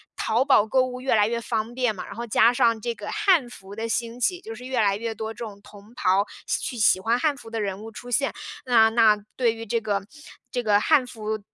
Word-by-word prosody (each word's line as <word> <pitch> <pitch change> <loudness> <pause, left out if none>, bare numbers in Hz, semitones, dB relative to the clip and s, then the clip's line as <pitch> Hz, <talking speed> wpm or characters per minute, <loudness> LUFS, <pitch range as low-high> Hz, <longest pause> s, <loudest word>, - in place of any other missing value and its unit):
淘 225 +3 +1
宝 265 -6 +4
购 255 +4 +2
物 255 0 -3
越 265 - 0
来 210 -1 +4
越 235 0 -2
方 225 +1 -3
便 245 -5 0
嘛， - - -6
然 - - -9
后 235 - -5
加 225 +2 +5
上 230 -2 +2
这 235 +1 -2
个 205 0 -8
汉 375 - +2
服 195 -3 -12
的 225 +1 -3
兴 235 +1 -3
起， 355 +9 0
就 445 +3 -8
是 250 - -11
越 255 -1 -2
来 200 -1 +2
越 230 +1 -4
多 220 0 -5
这 210 - -26
种 200 -2 -11
同 205 +2 -16
袍 195 -4 +2 0.2
喜 - - -1
去 245 - -4
喜 210 -3 +4
欢 230 +4 +1
汉 300 0 +1
服 225 - -12
的 225 -1 -3
人 200 0 -3
物 225 - -9
出 245 +3 -10
现。 275 +3 +1 0.3
那 225 -3 +5
那 225 -2 +4 0.2
对 235 -3 +2
于 225 0 -8
这 230 +2 0
个 205 -3 -2 0.5
这 245 - -1
个 205 -2 +4
汉 275 -5 +3
服 215 -2 -4
230 Hz, 270 characters per minute, -24 LUFS, 215-245 Hz, 0.5 s, 加